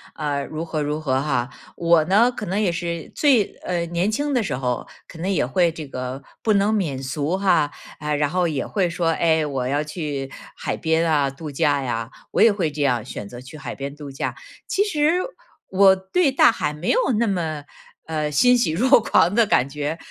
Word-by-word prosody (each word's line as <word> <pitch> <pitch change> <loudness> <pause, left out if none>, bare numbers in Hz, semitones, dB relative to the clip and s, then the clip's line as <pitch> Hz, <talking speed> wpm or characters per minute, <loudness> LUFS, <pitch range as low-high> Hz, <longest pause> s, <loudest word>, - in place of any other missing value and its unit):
呃， 145 -2 -2
如 155 +1 -5
何 160 -2 -2
如 150 +1 -2
何 130 -3 +1
哈。 135 -3 -1 0.3
我 170 -2 +4
呢， 215 +8 +4
可 220 - -6
能 195 +3 -1
也 195 -5 +2
是 170 -2 -4
最， 260 -9 +3
呃， 170 -2 -2
年 175 +5 0
轻 290 +6 -1
的 245 -4 +1
时 145 -10 -2
候 125 -2 -2 0.2
可 165 - -12
能 185 +4 -2
也 185 - +1
会 170 +7 +2
这 155 -3 -8
个 130 +1 -5 0.2
不 220 - +3
能 200 +1 +3
免 165 -11 -1
俗 145 +5 -2
哈， 185 -7 +2 0.3
啊， 150 0 -3
然 145 0 +1
后 180 +2 +1
也 145 -6 -2
会 190 -4 0
说：” 170 0 -2
哎， 160 -1 +2
我 135 -4 -2
要 145 +3 0
去 145 -4 -5 0.2
海 - - -3
边 165 +1 +1
啊 140 -3 +2
度 150 +2 -8
假 140 0 +1
呀。 115 -3 -3 0.2
“我 - - +1
也 230 - +7
会 180 -6 0
这 145 0 -3
样 125 -5 +1
选 105 -4 -7
择 120 +3 -10
去 135 +4 -11
海 135 -4 -6
边 140 +1 -6
度 145 -2 -9
假， 135 - -3 0.3
其 400 - +2
实 300 -7 +1 0.6
我 190 0 +6
对 265 - +1
大 260 - +6
海 150 -9 -2
没 150 +4 -1
有 - - +3 0.2
那 235 - +2
么， 165 -7 -2 0.4
呃 155 -2 -2
欣 250 - +5
喜 235 -10 +1
若 240 - +4
狂 175 -3 +3
的 230 0 +4
感 130 -9 +3
觉。 150 +3 -3
160 Hz, 225 characters per minute, -22 LUFS, 140-190 Hz, 0.6 s, 也